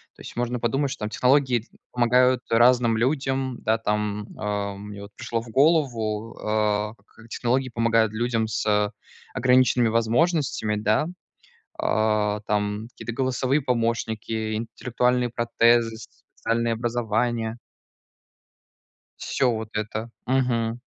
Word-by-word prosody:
То - - -15
есть - - -10
можно 120 0 -1
подумать, 135 +4 0
что, - - -6
там, 105 - -3
технологии 130 +1 +3
т 115 - -21 0.2
помогают 125 +1 +3
разным 120 0 +4
людям. 130 0 0
Да, 110 +1 +2
там, 105 -1 -2
а. 100 -1 -2
Мне 100 0 -9
вот 100 - -11
пришло 115 -1 -3
в 115 - -12
голову, 115 -6 +1
э, 105 0 0
как 115 +1 -18
технологии 130 +3 0
помогают 115 -2 +2
людям 115 0 0
с 105 -1 +1 0.4
ограниченными 125 -1 +4
возможностями, 115 0 +1
да. 105 +7 +1 0.7
А, 105 -1 +1
там, 105 +1 -1
какие-то 115 - -7
голосовые 130 +3 0
помощники, 115 -3 -1
интеллектуальные 125 +2 0
протезы, 115 -1 +2
специальные 115 +1 -3
образования. 115 0 -1 1.6
Всё 130 -2 +1
вот 110 -1 -4
это. 110 +2 -3 0.2
Мгм. 120 -3 0
115 Hz, 120 wpm, -24 LUFS, 110-125 Hz, 1.6 s, разным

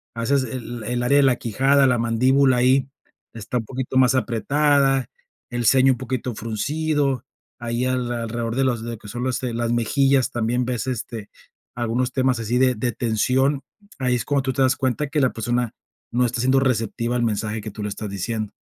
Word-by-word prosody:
haces 130 +4 +1
el 120 -1 -6
el 120 0 -1
área 140 +4 +3
de 145 - +5
la 130 -2 +4
quijada, 135 +4 +3
la 125 -1 +2
mandíbula 130 +3 +3
ahí, 130 +2 +3 0.5
está 115 +2 -4
un 115 - -3
poquito 130 +2 -3
más 130 +1 +5
apretada, 135 +2 +2 0.4
el 120 -1 -3
ceño 130 +2 +5
un 125 - -6
poquito 125 0 -3
fruncido, 140 +5 -1 0.3
ahí 120 +1 -2
alrededor 120 -2 -2
de 135 - +2
los 120 -3 0 0.2
que - - -13
son, 120 +3 -3
este, 125 -1 -2
las 115 0 -1
mejillas 135 +3 +2
también 120 +2 0
ves, 125 -1 -3
este, 115 -3 -5 0.5
algunos 120 +1 -1
temas 130 -2 +1
así 115 +2 -1
de 130 0 +3
de 120 +3 -1
tensión, 130 +5 +1 0.4
ahí 125 -1 +1
es 120 - -1
cuando 140 -2 +1
tú 130 -1 -1
te 135 - -1
das 130 +1 +3
cuenta 135 +2 -1
que 150 +2 -1
la 130 - +3
persona 120 +1 -1 0.4
no 125 +1 +2
está 120 0 -2
siendo 130 +2 +3
receptiva 120 -1 0
al 120 - 0
mensaje 110 0 -1
que 110 - -7
tú 105 0 -7
le 105 - -2
estás 105 +1 -5
diciendo. 105 +2 -3
125 Hz, 190 wpm, -22 LUFS, 115-130 Hz, 0.5 s, de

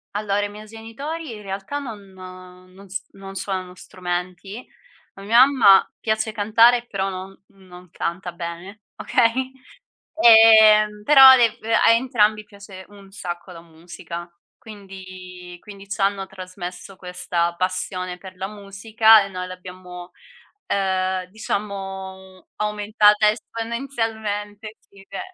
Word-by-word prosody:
Allora 205 -1 -1
i - - -5
miei 210 +1 -11
genitori 230 +7 -8
in 210 - -12
realtà 195 +7 -5
non 230 -8 -7
non 185 +1 -14
s 195 +2 -5
non 195 0 -12
suonano 185 -2 -5
strumenti. 185 +5 -6 0.5
A 195 - -13
mia 230 +5 +6
mamma 230 -9 +5
piace 220 0 -2
cantare 230 +3 +3
però 195 -2 -3
no 190 +1 -9
non 180 -2 -17
canta 175 +1 -5
bene, 175 +4 -8
okay. 255 +2 0 0.7
Ehm, 220 -3 +6
però 270 0 +9
dev 230 -2 +2
a 225 0 +3
entrambi 220 -3 +1
piace 200 -2 -13
un 200 -1 -16
sacco 175 -1 -7
la 165 - -12
musica. 170 +1 -10 0.3
Quindi 185 -3 -12
quindi 200 -1 -13
c'hanno 195 0 -1
trasmesso 185 0 -10
questa 175 -2 -3
passione 185 0 -3
per 185 0 -13
la 190 +1 -5
musica 210 +2 +3
e 200 - -7
noi 185 -1 -6
l'abbiamo, 180 -1 -11 0.5
ehm, 190 -1 -1
diciamo 190 -2 -7
aumentata 210 0 +2
esponenzialmente, 220 -2 -5
sì 195 -1 -20
che, 195 - -8
195 Hz, 120 wpm, -21 LUFS, 185-220 Hz, 0.7 s, però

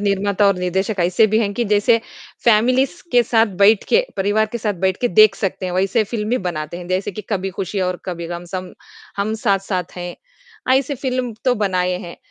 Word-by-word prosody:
निर्माता 200 0 +1
और 200 -2 +3
निर्देशक 190 +3 -1
ऐसे 180 +5 +4
भी 215 +1 +1
हैं 205 -2 0
कि 240 - 0
जैसे 225 +3 +4 0.4
फ़ैमिलीज़ 255 - +3
के 245 - +6
साथ 225 -1 +3 0.2
बैठ 210 +1 +5
के, - - +4
परिवार 205 +3 +1
के 235 - -2
साथ 210 -2 -1
बैठ 190 0 0
के 245 - +2
देख 215 +1 +6
सकते 190 -1 -3
हैं, 180 - -4
वैसी 195 +4 +1
फिल्म 215 0 -4
ही 250 - +2
बनाते 155 0 -5
हैं। 175 - -9
जैसे 190 +2 -1
कि 215 - -7
कभी 195 -2 -1
खुशी 195 +1 -2
और 180 -1 -1
कभी 170 -2 -5
गम, 175 +1 -6
सम 185 +1 -6 0.4
हम 205 +2 -1
साथ-साथ 195 -3 -1
हैं, 175 0 -5 0.6
ऐसी 275 +2 +1
फिल्म 255 -2 -2
तो 255 -1 +3
बनाए 185 -4 0
हैं। 170 -1 -9
200 Hz, 205 wpm, -19 LUFS, 185-225 Hz, 0.6 s, के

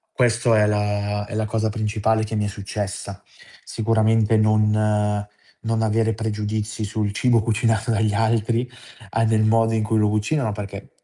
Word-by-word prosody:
Questo 120 -1 +2
è 105 -1 +4
la 105 0 -1
è - - -8
la 110 0 0
cosa 110 0 -1
principale 110 +1 0
che 110 +1 -6
mi 105 -1 0
è - - -1
successa. 100 -1 -6 0.4
Sicuramente 110 -1 +2
non 105 -1 +2 0.4
non 115 0 -1
avere 110 +1 +1
pregiudizi 110 0 -3
sul 105 0 -2
cibo 115 +1 +2
cucinato 110 +1 0
dagli 110 -2 +1
altri, 115 +2 +1 0.4
a 115 0 +1
del 110 -1 +2
modo 115 +1 +3
in 110 - +1
cui 110 +1 0
lo 105 -1 +3
cucinano, 110 +4 0
perché 100 -1 -7
110 Hz, 160 wpm, -22 LUFS, 105-115 Hz, 0.4 s, è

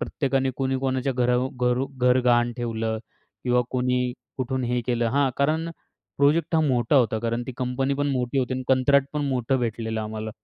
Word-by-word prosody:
प्रत्येकाने 135 -3 0
कुणी 135 -1 0
कोणाच्या 130 0 -1
घरावर 125 +1 +1 0.2
घरू 125 +2 0
घर 125 0 +4
गहाण 120 -1 +3
ठेवलं 115 -2 -2 0.5
किंवा 125 -1 +3
कोणी 125 -1 0 0.2
कुठून 130 0 -2
हे 125 +1 0
केलं 120 -1 +1
हां, 140 0 +2
कारण 155 +4 +1 0.5
प्रोजेक्ट 150 +4 +3
हा 160 - +4
मोठा 130 -2 +2
होता 115 -3 +3
कारण 115 +1 -2
ती 130 - -5
कंपनी 130 +2 -1
पण 145 +1 -1
मोठी 125 0 -1
होती 130 0 0
आणि 130 - -3
कंत्राट 135 +1 +4
पण 150 -1 -1
मोठं 130 0 0
भेटलं 110 -1 -2
आम्हाला. 110 0 -5
125 Hz, 180 wpm, -25 LUFS, 120-135 Hz, 0.5 s, घर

